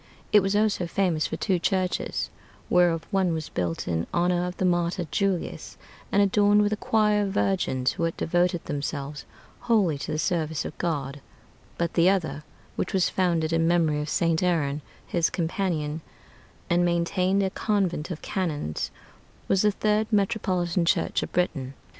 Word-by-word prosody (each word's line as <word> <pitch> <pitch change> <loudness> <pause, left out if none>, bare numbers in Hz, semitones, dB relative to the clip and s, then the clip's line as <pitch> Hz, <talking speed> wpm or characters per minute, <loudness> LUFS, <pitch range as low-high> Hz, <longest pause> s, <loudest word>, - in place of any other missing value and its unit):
It 210 - +7
was 195 +1 0
also 205 -4 +1
famous 170 -3 +1
for - - -4
two 190 -4 0
churches: 185 0 -1 0.4
whereof 175 -2 +3
one 190 -4 +2
was 160 -1 -4
built 85 -2 -3
in 85 -1 -1
honor 175 0 +1
of 180 - -6
the 185 - 0
martyr 175 0 +1
Julius, 195 -3 -2 0.3
and 200 - +4
adorned 205 +1 +4
with 205 +1 +1
a - - +1
choir 210 -1 +2
of 195 -1 -2
virgins, 155 -11 +1
who - - -4
had 165 - -3
devoted 175 0 +1
themselves 145 0 -4 0.3
wholly 210 -11 +2
to 155 - -5
the 155 - -1
service 160 -1 -1
of - - -6
God; 145 -4 -2 0.6
but 170 -1 -1
the 175 +1 +5
other, 170 -6 -1 0.3
which 185 - -2
was 185 - +3
founded 170 -3 +1
in 165 0 +2
memory 160 -3 +2
of 150 - -4
St. 165 0 +1
Aaron, 155 -5 0 0.2
his 170 -2 +1
companion, 165 -3 -2 0.7
and 175 +1 +2
maintained 180 +3 +1
a 190 - 0
convent 190 -8 -1
of 170 -3 -6
canons, 155 - -2 0.6
was 195 - +3
the 210 - +4
third 210 +1 +1
metropolitan 190 -5 +1
church 170 - +1
of - - -5
Britain. 140 -7 -1
175 Hz, 165 wpm, -26 LUFS, 160-195 Hz, 0.7 s, It